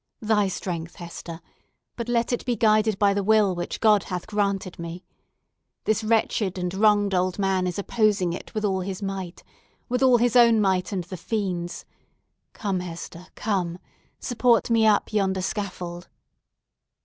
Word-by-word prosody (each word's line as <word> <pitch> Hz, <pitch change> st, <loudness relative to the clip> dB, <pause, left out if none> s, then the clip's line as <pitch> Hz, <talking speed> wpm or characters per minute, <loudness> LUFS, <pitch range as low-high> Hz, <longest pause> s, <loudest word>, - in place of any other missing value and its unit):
Thy 210 Hz, -2 st, +2 dB
strength, 175 Hz, -3 st, -5 dB
Hester; 170 Hz, -1 st, -8 dB, 0.5 s
but 235 Hz, 0 st, -5 dB
let 235 Hz, 0 st, +1 dB
it 240 Hz, -, -2 dB
be 245 Hz, -2 st, 0 dB
guided 215 Hz, -2 st, +3 dB
by 200 Hz, 0 st, +3 dB
the 200 Hz, 0 st, -1 dB
will 210 Hz, -2 st, +4 dB
which 175 Hz, 0 st, -4 dB
God 215 Hz, -3 st, +4 dB
hath 180 Hz, -2 st, -4 dB
granted 200 Hz, -4 st, -2 dB
me! 170 Hz, +2 st, -7 dB, 0.8 s
This 215 Hz, +1 st, 0 dB
wretched 215 Hz, -3 st, +1 dB
and 180 Hz, 0 st, -2 dB
wronged 205 Hz, 0 st, +3 dB
old 185 Hz, 0 st, +1 dB
man 190 Hz, -2 st, +1 dB
is 180 Hz, -, -3 dB
opposing 200 Hz, -4 st, +1 dB
it 180 Hz, -, -9 dB
with 215 Hz, 0 st, -1 dB
all 190 Hz, -2 st, +1 dB
his 190 Hz, +2 st, -5 dB
might!—with 195 Hz, +6 st, -6 dB
all 255 Hz, -2 st, +6 dB
his 240 Hz, +1 st, +1 dB
own 235 Hz, -2 st, +6 dB
might, 190 Hz, -2 st, +1 dB
and 190 Hz, -3 st, -2 dB
the 180 Hz, +2 st, -8 dB
fiend's! 180 Hz, -3 st, -3 dB, 0.7 s
Come, 195 Hz, -4 st, -2 dB
Hester—come! 180 Hz, +1 st, -4 dB, 0.4 s
Support 245 Hz, -1 st, +2 dB
me 225 Hz, -1 st, +4 dB
up 210 Hz, 0 st, +2 dB
yonder 190 Hz, -3 st, +1 dB
scaffold." 180 Hz, -3 st, -5 dB
200 Hz, 150 wpm, -25 LUFS, 180-215 Hz, 0.8 s, all